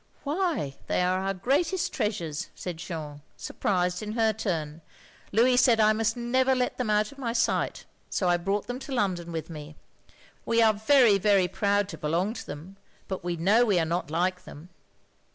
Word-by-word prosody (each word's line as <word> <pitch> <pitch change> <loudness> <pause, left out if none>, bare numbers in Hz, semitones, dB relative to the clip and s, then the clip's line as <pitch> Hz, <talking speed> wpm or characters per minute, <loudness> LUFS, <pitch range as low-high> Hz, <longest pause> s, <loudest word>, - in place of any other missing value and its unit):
"Why, 300 - -1
they - - +1
are 185 +1 +1
our 195 0 -2
greatest 315 - 0
treasures," 170 -8 -3
said 180 -3 -6
Jeanne, 155 -4 -7 0.2
surprised 180 -1 -1
in 215 0 -5
her 225 -1 +2
turn. 165 -7 -3 0.5
"Louis 245 +4 +4
said 245 -3 +5
I 215 0 +5
must 225 +1 0
never 260 +2 +2
let 250 0 -1
them 245 -3 -1
out 210 0 +2
of 280 - -15
my 235 -3 -2
sight, 235 - 0 0.2
so 185 - -1
I 175 0 +3
brought 195 +4 -2
them 245 +1 -5
to 275 - -9
London 185 -8 -1
with 160 -1 -4
me. 150 -2 -9 0.7
We 230 0 +1
are 220 -1 +5
very, 220 -1 +4
very 195 -2 +3
proud 200 +2 0
to - - -8
belong 170 +8 0
to - - -8
them, 170 +7 -9 0.3
but 190 -3 -5
we 175 -1 -2
know 200 +8 +4
we 205 -6 +2
are 165 - +2
not 170 0 -2
like 180 +3 -1
them. 160 +2 -12
200 Hz, 190 wpm, -27 LUFS, 175-230 Hz, 0.7 s, said